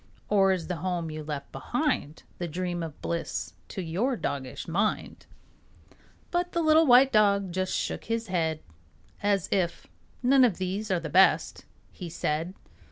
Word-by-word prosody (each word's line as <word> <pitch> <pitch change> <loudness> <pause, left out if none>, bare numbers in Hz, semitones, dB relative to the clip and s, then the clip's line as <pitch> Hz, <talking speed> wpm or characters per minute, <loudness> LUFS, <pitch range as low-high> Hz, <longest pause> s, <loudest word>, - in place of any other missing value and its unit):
Or 195 -2 +4
is 180 -3 -1
the 180 - -3
home 170 -1 -2
you 155 0 -6
left 145 -2 -6
behind 245 - -2 0.2
The 175 - -2
dream 175 +1 -3
of 160 -3 -6
bliss 170 0 -3
to 190 - -5
your 215 +11 -1
doggish 130 -7 -4
mind? 195 +6 -1 1.0
But 355 0 -1
the 340 - +1
little 315 0 +5
white 255 +2 +7
dog 200 -3 +3
just 185 +1 -1
shook - - -3
his 230 0 -2
head 165 -5 -1 0.6
As 200 -3 +1
if 180 -3 0 0.4
"None 260 +1 +5
of 225 -8 +3
these 190 +3 -3
are 185 -2 +1
best," 170 +4 +3 0.3
he 180 -3 -8
said. 165 +2 -2
185 Hz, 155 wpm, -27 LUFS, 165-215 Hz, 1.0 s, white